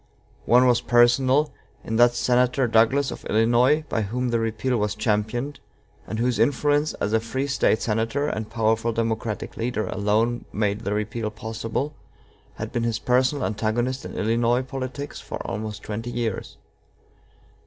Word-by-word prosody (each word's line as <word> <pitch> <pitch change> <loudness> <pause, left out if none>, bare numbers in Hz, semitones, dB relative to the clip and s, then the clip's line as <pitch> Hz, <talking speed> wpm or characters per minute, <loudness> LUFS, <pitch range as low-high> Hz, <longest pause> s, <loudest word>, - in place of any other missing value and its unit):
One 125 +2 +6
was 125 -1 +4
personal, 130 +4 +3 0.3
in 110 - -2
that 120 0 +5
Senator 125 +2 +2
Douglas 115 +5 +3
of - - -8
Illinois, 120 +7 +3
by 115 - -1
whom 125 +5 -2
the 120 -1 +1
repeal 115 +3 -1
was 105 -1 -1
championed, 110 +6 -1 0.5
and 110 - -4
whose 120 -1 0
influence 145 +5 +2
as 105 - -2
a 110 - +4
free 120 +5 -3
State 140 -5 +1
senator 115 +6 0
and 110 -6 -3
powerful 115 +1 +1
Democratic 110 -1 -2
leader 115 -2 -1
alone 110 +5 0
made 105 0 0
the 105 -2 -2
repeal 110 +1 -2
possible, 110 +6 -4 0.6
had 110 +1 -5
been 120 -1 -1
his 115 -2 0
personal 130 +4 +1
antagonist 115 +4 -1
in - - -8
Illinois 115 +3 +1
politics 135 +2 -6
for - - -6
almost 105 0 -5
twenty 115 +3 -4
years. 120 -3 -3
115 Hz, 150 wpm, -24 LUFS, 110-125 Hz, 0.6 s, One